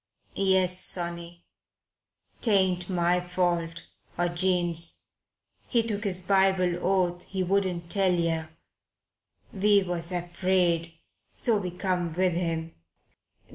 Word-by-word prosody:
"Yes, 190 -2 +2
sonny. 170 -1 -6 1.0
'Tain't 190 -5 +2
my 175 -1 +2
fault, 175 -2 -2 0.3
or 175 0 +1
Jane's. 175 -2 +1 0.6
He 235 -3 +2
took 210 -2 -3
his 185 -2 -2
Bible 190 -2 +2
oath 180 -1 +1
he 190 -1 -3
wouldn't 180 -2 -1
tell 195 -2 +3
yer. 165 -2 0 1.0
We 200 0 +3
was 175 -1 -1
afraid, 175 -1 0 0.4
so 230 -3 +1
we 185 -3 -3
come 180 -2 -2
with 180 +1 +1
him." 165 -1 -2
180 Hz, 105 wpm, -27 LUFS, 170-190 Hz, 1.0 s, tell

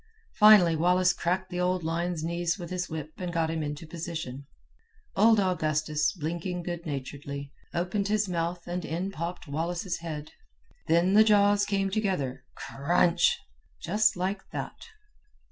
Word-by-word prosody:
"Finally 210 -6 +8
Wallace 180 +2 +3
cracked 185 +2 -2
the 180 - -3
old 180 0 0
lion's 165 0 -2
knees 170 +1 -1
with 175 -3 -8
his 180 -1 -3
whip 155 -1 -5
and 180 -2 -3
got 165 -1 0
him 165 -1 -2
into 150 +1 -5
position. 160 -5 -6 0.7
Old 220 +2 +5
Augustus, 155 -5 +1
blinking 175 +2 -4
good 175 0 -5
naturedly, 140 0 -5 0.2
opened 185 +4 -1
his 210 0 +1
mouth 170 0 -2
and 175 0 -3
in 175 +5 -3
popped 175 0 -5
Wallace's 170 +5 -2
head. 155 -2 -6 0.6
Then 170 +4 +3
the 215 +1 +8
jaws 205 -1 +4
came 195 -1 0
together, 165 - -1
CRUNCH, 170 +4 +2 0.4
just 210 +5 +2
like 190 +2 -2
that." - - -6
175 Hz, 145 wpm, -28 LUFS, 160-185 Hz, 0.7 s, Finally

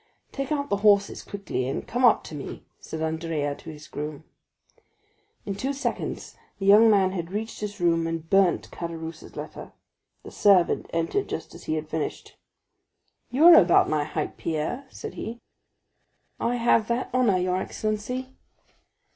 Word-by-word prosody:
"Take 275 0 -4
out 285 -4 -1
the 200 - +3
horses 200 -1 +3
quickly, 200 -10 -4
and 135 - -4
come 245 +2 -1
up 240 -3 +5
to - - -10
me," 145 -2 -7 0.2
said 160 0 -6
Andrea 160 -2 -2
to 160 - -11
his 150 -1 -10
groom. 150 0 -6 1.2
In 200 - -2
two 265 +8 -2
seconds 280 - -4 0.2
the 195 - -4
young 210 +3 +7
man 195 -3 +4
had 170 -3 -4
reached 220 +3 -4
his 210 -1 -5
room 165 -1 +2
and 165 -1 -4
burnt 195 0 +2
Caderousse's 165 -1 -7
letter. - - -8 0.5
The - - -10
servant 190 -4 +3
entered 165 - -1
just - - -5
as - - -12
he 155 - -1
had 155 0 -4
finished. 155 0 -4 0.9
"You 270 +7 +3
are 345 - +11
about 175 - +6
my 150 -1 +1
height, 155 0 -4
Pierre," 165 - -3
said - - -8
he. 235 +1 -6 1.0
"I 240 - 0
have 230 -2 +3
that 240 +2 -1
honor, 245 -7 +3
your 180 0 0
excellency." 220 +7 -3
195 Hz, 160 wpm, -26 LUFS, 160-230 Hz, 1.2 s, are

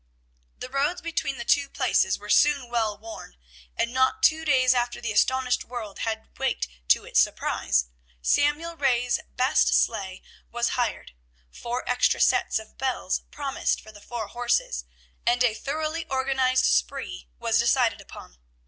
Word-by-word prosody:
The - - -6
roads 285 +7 0
between 330 -5 -3
the 235 - -6
two 280 +2 +2
places 250 -9 +1
were 210 +1 -6
soon 285 -4 +3
well 220 -3 0
worn, 220 - -10 0.4
and 235 - 0
not 260 0 +1
two 320 0 +4
days 260 -4 +4
after 245 -1 -1
the 235 -2 -3
astonished 255 +4 +2
world 230 -5 -7
had 220 -1 -4
waked 265 - -1 0.2
to - - +4
its - - +2
surprise, 60 -2 0 0.3
Samuel 295 - +1
Ray's 250 -5 +1 0.2
best 260 +4 +3
sleigh 195 -5 -2 0.3
was 240 0 0
hired, 240 -3 -2 0.4
four 240 - -5
extra 250 0 +2
sets - - +3
of 220 0 -10
bells 260 -8 -1
promised 280 -2 -2
for 215 - -13
the 205 -1 -15
four 235 -1 -5
horses, 240 - -1 0.4
and 245 +1 +2
a 240 -3 +3
thoroughly 310 +7 -3
organized 265 -1 +1
"spree" - - -1
was - - +1
decided - - +2
upon. - - -13
245 Hz, 150 wpm, -25 LUFS, 220-270 Hz, 0.4 s, two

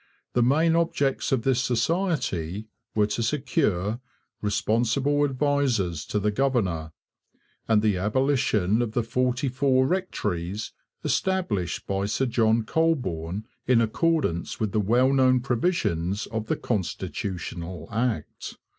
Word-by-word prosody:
The 120 - +2
main 155 +7 +3
objects 155 -5 0
of 130 -4 +1
this 130 -1 +2
society 125 - -1 0.3
were 105 -1 +4
to 105 +3 -2
secure 115 - 0 0.4
'responsible 120 +7 +1
advisers 130 - 0
to - - -2
the 105 +1 +1
governor,' 100 - 0 0.8
and 110 -2 +3
the 105 -4 +2
abolition 110 -1 +1
of 115 -3 -2
the 120 - +1
forty 125 +3 0
four 130 0 +2
rectories 105 - -2 0.3
established 115 - -1
by 100 0 -1
Sir 135 +5 0
John 115 -2 +2
Colborne 110 - -1 0.2
in 125 -2 +5
accordance 115 - 0
with 110 -3 -1
the 110 - +1
well 125 +6 +3
known 130 -1 +4
provisions 115 - 0
of 110 0 -4
the - - +1
Constitutional 90 -4 -4
Act. 110 -7 -3
115 Hz, 120 wpm, -26 LUFS, 100-135 Hz, 0.8 s, in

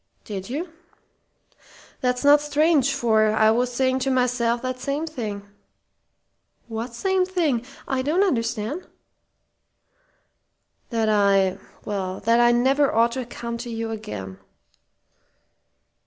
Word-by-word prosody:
"Did 195 -1 -6
you? 320 +6 -4 1.3
That's 250 0 -1
not 290 +1 +7
strange, 295 -2 +2
for 230 -5 +2
I 220 0 +4
was 245 +2 +1
saying 260 +1 +1
to 265 +1 -1
myself 250 -2 +1
that 255 0 -3
same 280 +4 -2
thing." 215 -10 -6 1.2
"What 230 +1 -5
same 380 +6 +1
thing? 335 -10 0 0.2
I 265 -1 0
don't 315 +9 +2
understand." 230 - -2 2.0
"That 225 -2 0
I 200 -3 +3 0.3
well, 190 -2 -3
that 230 +1 +3
I 240 0 +5
never 265 +4 +3
ought 230 +1 +3
to 250 0 -4
come 235 -1 -6
to 240 0 -6
you 225 -1 -4
again." 100 - -7
240 Hz, 120 wpm, -23 LUFS, 220-275 Hz, 2.0 s, not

